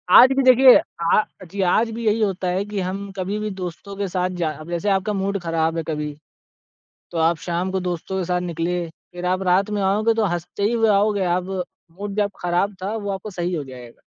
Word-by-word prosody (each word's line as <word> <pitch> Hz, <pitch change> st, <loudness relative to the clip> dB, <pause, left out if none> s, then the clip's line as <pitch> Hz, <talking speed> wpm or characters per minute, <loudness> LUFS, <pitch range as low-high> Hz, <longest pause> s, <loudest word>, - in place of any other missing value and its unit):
आज 255 Hz, +2 st, +9 dB
भी 275 Hz, -, +4 dB
देखिए, 255 Hz, 0 st, +8 dB, 0.3 s
अ 170 Hz, +5 st, +4 dB, 0.3 s
जी, 200 Hz, 0 st, -2 dB
आज 215 Hz, +5 st, +3 dB
भी 230 Hz, +1 st, -5 dB
यही 215 Hz, +1 st, +2 dB
होता 195 Hz, -3 st, 0 dB
है 185 Hz, +2 st, 0 dB
कि 205 Hz, -1 st, -4 dB
हम 195 Hz, +2 st, -4 dB
कभी 190 Hz, +2 st, -2 dB
भी 215 Hz, 0 st, -2 dB
दोस्तों 180 Hz, +3 st, -6 dB
के 200 Hz, -, -1 dB
साथ 180 Hz, 0 st, -1 dB
जा 155 Hz, -, +1 dB, 0.2 s
जैसे 175 Hz, +4 st, -1 dB
आपका 195 Hz, +2 st, +1 dB
मूड 200 Hz, 0 st, -1 dB
खराब 165 Hz, 0 st, 0 dB
है 165 Hz, -, -1 dB
कभी, 150 Hz, -2 st, -3 dB, 1.0 s
तो 170 Hz, -, -4 dB
आप 165 Hz, +1 st, +3 dB
शाम 175 Hz, +2 st, -1 dB
को 190 Hz, -, 0 dB
दोस्तों 175 Hz, +2 st, -4 dB
के 180 Hz, -, -2 dB
साथ 180 Hz, 0 st, 0 dB
निकले। 170 Hz, +2 st, -1 dB
फिर 175 Hz, +2 st, -10 dB
आप 185 Hz, +1 st, +1 dB
रात 185 Hz, +3 st, +2 dB
में -, -, -1 dB
आओगे 210 Hz, +4 st, +2 dB
तो 225 Hz, -1 st, +1 dB
हँसते 190 Hz, +5 st, -2 dB
हुए 225 Hz, -1 st, +2 dB
ही 210 Hz, -, +5 dB
आओगे 205 Hz, 0 st, +2 dB
आप 180 Hz, -, -3 dB, 0.6 s
मूड 200 Hz, -1 st, -4 dB
जब 205 Hz, -1 st, +1 dB
खराब 180 Hz, +3 st, 0 dB
था 205 Hz, +3 st, -2 dB
वो 205 Hz, -2 st, -3 dB
आपको 195 Hz, +2 st, -5 dB
सही 175 Hz, +1 st, -1 dB
हो 155 Hz, -4 st, -2 dB
जाएगा। 125 Hz, -3 st, -12 dB
190 Hz, 220 wpm, -22 LUFS, 175-205 Hz, 1.0 s, आज